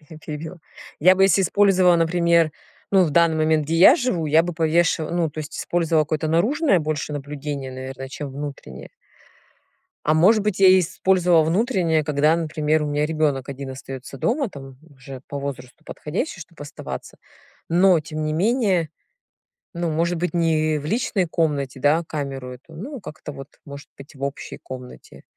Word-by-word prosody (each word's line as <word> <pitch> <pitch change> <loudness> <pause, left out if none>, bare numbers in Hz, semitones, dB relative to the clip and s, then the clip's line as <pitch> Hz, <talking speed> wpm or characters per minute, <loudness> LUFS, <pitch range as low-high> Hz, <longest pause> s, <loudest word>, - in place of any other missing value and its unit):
я 160 - -11
перебила. 155 +3 -7 0.4
Я 185 +4 +6
бы 190 - +4
если 195 0 +4
использовала, 185 -2 +4
например, 170 -1 +2 0.4
ну, 190 -2 +5
в 155 - -1
данный 165 +1 +3
момент, 155 -1 +2
где 160 - -1
я 195 - +8
живу, 245 - -1
я 155 +2 +4
бы 175 - -4
повешива 165 -1 +1
ну, 170 -2 0
то 150 - -11
есть 155 0 -6
использовала 165 -3 +1
какое-то 155 +1 -2
наружное 215 - +2
больше 150 -1 -3
наблюдение, 145 -1 -5
наверное, 130 +1 -7
чем 140 +1 -7
внутреннее. 135 - -8 1.2
А 155 - +2
может 200 +7 +4
быть 210 -2 -2
я 190 -1 +7
использовала 180 -1 +2
внутреннее, 170 - +1
когда, 150 +2 +2
например, 155 -1 0
у - - -2
меня 150 +1 0
ребенок 150 -4 -1
один 135 -1 -6
остаётся 135 0 -9
дома. 255 0 0
Там 135 -4 -11 0.2
уже 135 -1 -11
по 140 - -5
возрасту 135 -3 -7
подходящий, 180 - -5
чтоб 165 -1 -13
оставаться. 145 0 -8 0.5
Но 180 0 +5
тем 155 0 -6
не 155 0 -1
менее, 190 - +1 0.8
ну, 170 -1 -2
может 170 +3 0
быть, 175 +2 -2
не 155 -2 +1
в 145 - -7
личной 200 -1 0
комнате, 145 -5 -1
да, 150 +5 +3
камеру 135 -4 -5
эту, 135 +6 -17
ну, 255 - -7
как-то 150 -5 -9
вот, 135 +1 -10 0.2
может 140 0 -10
быть, 140 +3 -13
в 135 - -13
общей 140 +1 -5
комнате. 125 -1 -11
155 Hz, 170 wpm, -22 LUFS, 145-175 Hz, 1.2 s, я